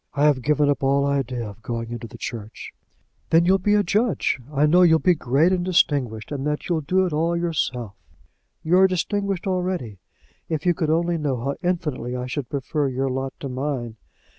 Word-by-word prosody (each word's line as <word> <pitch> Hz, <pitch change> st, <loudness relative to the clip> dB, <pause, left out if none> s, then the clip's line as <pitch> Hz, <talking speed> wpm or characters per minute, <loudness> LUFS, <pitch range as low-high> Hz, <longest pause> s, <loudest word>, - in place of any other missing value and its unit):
"I 145 Hz, +1 st, +3 dB
have 145 Hz, -4 st, +3 dB
given 150 Hz, +2 st, +2 dB
up 145 Hz, -, +1 dB
all 140 Hz, +1 st, +2 dB
idea 130 Hz, -4 st, -1 dB
of 105 Hz, +1 st, -11 dB
going 115 Hz, 0 st, -4 dB
into 120 Hz, 0 st, -6 dB
the -, -, -12 dB
church." 110 Hz, -2 st, -7 dB, 0.6 s
"Then 165 Hz, +1 st, +4 dB
you'll 190 Hz, +2 st, +4 dB
be 205 Hz, +3 st, +2 dB
a 205 Hz, -, +3 dB
judge. 205 Hz, -, +1 dB
I 145 Hz, 0 st, +2 dB
know 175 Hz, +4 st, +5 dB
you'll 165 Hz, -3 st, +6 dB
be 180 Hz, +3 st, +3 dB
great 145 Hz, +3 st, +2 dB
and 180 Hz, -2 st, +1 dB
distinguished, 140 Hz, -11 st, +1 dB
and 140 Hz, -2 st, -3 dB
that 150 Hz, 0 st, -2 dB
you'll 170 Hz, -3 st, 0 dB
do 185 Hz, +6 st, +1 dB
it 175 Hz, -, -3 dB
all 165 Hz, +3 st, +1 dB
yourself. 130 Hz, -, -2 dB, 0.7 s
You 175 Hz, +3 st, +3 dB
are 190 Hz, -, +7 dB
distinguished 195 Hz, +1 st, -2 dB
already. 180 Hz, -, -2 dB, 0.5 s
If 155 Hz, -1 st, -2 dB
you 175 Hz, -, +4 dB
could 160 Hz, -2 st, -2 dB
only 170 Hz, +1 st, +1 dB
know 145 Hz, -3 st, -1 dB
how 140 Hz, +3 st, -2 dB
infinitely 155 Hz, -9 st, -2 dB
I 125 Hz, 0 st, -3 dB
should 130 Hz, 0 st, -4 dB
prefer 140 Hz, +1 st, -1 dB
your 130 Hz, +1 st, -1 dB
lot 135 Hz, +1 st, -3 dB
to 140 Hz, -, -4 dB
mine! 130 Hz, -3 st, -3 dB
150 Hz, 200 wpm, -23 LUFS, 130-175 Hz, 0.7 s, are